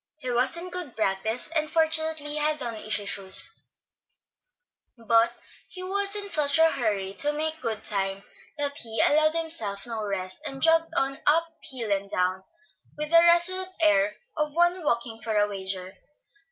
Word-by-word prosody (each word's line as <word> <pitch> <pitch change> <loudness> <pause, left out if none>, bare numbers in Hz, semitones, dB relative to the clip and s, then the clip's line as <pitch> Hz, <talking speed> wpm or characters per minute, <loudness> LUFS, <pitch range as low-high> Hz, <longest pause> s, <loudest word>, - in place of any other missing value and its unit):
He 255 -5 -5
was 250 +7 0
in 360 +1 -7
good 355 -8 +1
practice, 220 +3 -1
and 310 -1 0
fortunately 315 -2 +1
had 300 0 +1
on 235 -2 -4
easy 215 -1 -2
shoes; 195 -1 -1 1.5
but 230 0 +3 0.4
he 370 - -9
was 400 +2 0
in 410 -1 -3
such 295 -6 +2
a 325 0 +5
hurry 205 -7 -2
to 290 +8 +1
make 315 +1 -2
good 220 -2 -3
time 195 -1 -1 0.3
that 285 -1 -2
he 225 -2 -1
allowed 310 +5 +4
himself 315 -12 0
no 225 -2 -5
rest, 185 +1 0
and 270 -1 -6
jogged 325 +2 +4
on, 275 -2 0
up 330 +3 +4 0.2
hill 235 -5 -3
and 200 0 -1
down, 185 0 -1 0.5
with 300 +1 -4
the 335 0 +7
resolute 350 +2 +3
air 310 -1 +3 0.2
of 300 -1 -2
one 345 +1 +2
walking 235 -4 -1
for 220 -1 -2
a 205 0 +3
wager. 190 -1 -5
285 Hz, 165 wpm, -26 LUFS, 215-320 Hz, 1.5 s, the